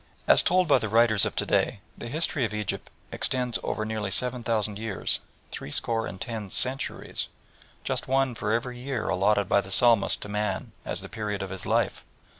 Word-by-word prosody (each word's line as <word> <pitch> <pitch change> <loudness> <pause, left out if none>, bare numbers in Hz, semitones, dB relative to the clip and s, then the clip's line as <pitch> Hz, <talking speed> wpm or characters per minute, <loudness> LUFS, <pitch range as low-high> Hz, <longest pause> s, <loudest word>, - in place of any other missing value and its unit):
As - - +7
told 185 0 +3
by 145 - +5
the 110 - -2
writers 110 -1 +4
of - - -6
to - - 0
day, - - +1 0.2
the 120 - -7
history 150 0 -1
of 110 -2 -1
Egypt 105 -3 -3 0.2
extends 125 -2 0
over 110 - -2
nearly 110 -2 -2
seven 125 +5 +2
thousand 105 -3 0
years 110 -4 -1 0.3
three - - -6
score 115 +8 0
and 95 +1 -7
ten 110 -3 -4
centuries 130 +7 0 0.6
just - - -2
one 135 -1 +2
for 105 -2 -2
every 120 +2 -1
year 130 -3 -2
allotted 100 +1 +2
by 100 - +4
the 95 - -11
Psalmist 115 +2 +4
to - - -6
man 105 -1 -2
as - - -2
the - - -7
period 105 -2 -3
of 95 - -6
his 95 -1 -6
life. - - +1
110 Hz, 195 wpm, -27 LUFS, 105-125 Hz, 0.6 s, As